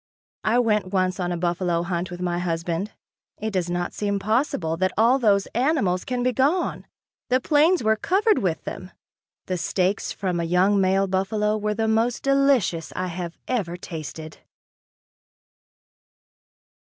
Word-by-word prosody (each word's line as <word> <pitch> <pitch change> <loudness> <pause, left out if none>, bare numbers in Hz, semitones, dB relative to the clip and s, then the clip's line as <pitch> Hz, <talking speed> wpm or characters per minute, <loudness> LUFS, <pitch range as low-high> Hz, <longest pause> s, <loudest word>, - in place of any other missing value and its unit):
I 220 +3 +2
went 210 -6 +1
once 185 -1 0
on 180 -1 -1
a 175 - -2
buffalo 175 0 0
hunt 175 0 -2
with 175 0 -7
my 175 -1 -1
husband. 170 +3 -2 0.5
It 220 +1 -3
does 180 -3 -1
not 175 0 -2
seem 200 -1 -1
possible 215 - 0
that 185 +2 +1
all 235 +5 +4
those 200 -5 +3
animals 240 - +1
can 250 -1 -2
be 255 0 +1
gone. 290 +10 0 0.4
The 255 +1 +3
plains 310 +5 +3
were 220 0 +3
covered 400 - +2
with 175 -5 -1
them. 185 - -7 0.6
The 185 - -2
steaks 185 +4 0
from 185 -3 -2
a - - 0
young 185 +4 +3
male 190 +1 +3
buffalo 205 +3 0
were 210 0 -1
the 225 0 0
most 225 +2 +1
delicious 275 - +2
I 185 0 -2
have 170 -1 -6
ever 190 -9 -2
tasted. 160 -2 -8
195 Hz, 155 wpm, -24 LUFS, 175-230 Hz, 0.6 s, all